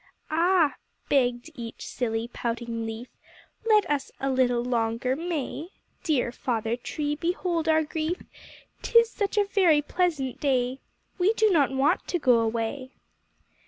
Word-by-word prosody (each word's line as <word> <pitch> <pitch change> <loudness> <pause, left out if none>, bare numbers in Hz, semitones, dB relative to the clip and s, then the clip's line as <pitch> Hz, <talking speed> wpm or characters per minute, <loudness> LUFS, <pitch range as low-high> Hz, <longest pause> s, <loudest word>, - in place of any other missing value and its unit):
"Ah!" 335 -1 +3 0.3
begged 245 +1 +1
each 235 -5 -8
silly, 225 -2 -2
pouting 235 -1 -4
leaf, 225 +2 -6 0.6
"Let 425 -1 +5
us 290 -2 -1
a 270 0 0
little 245 -2 +2
longer 235 +1 0
stay; 325 -1 -3 0.3
Dear 270 -7 +1
Father 235 -3 -2
Tree, 290 +4 -3
behold 335 0 -1
our 315 0 +4
grief; 315 +3 -3 0.6
Tis 465 -1 +4
such 410 0 -2
a 410 - +4
very 360 -7 +3
pleasant 300 -7 -1
day 260 -2 0 0.4
We 380 +5 +4
do 435 -1 +3
not 295 -6 +4
want 275 +6 +1
to 355 - 0
go 250 -7 +4
away." 230 +4 -2
275 Hz, 135 wpm, -26 LUFS, 240-335 Hz, 0.6 s, Let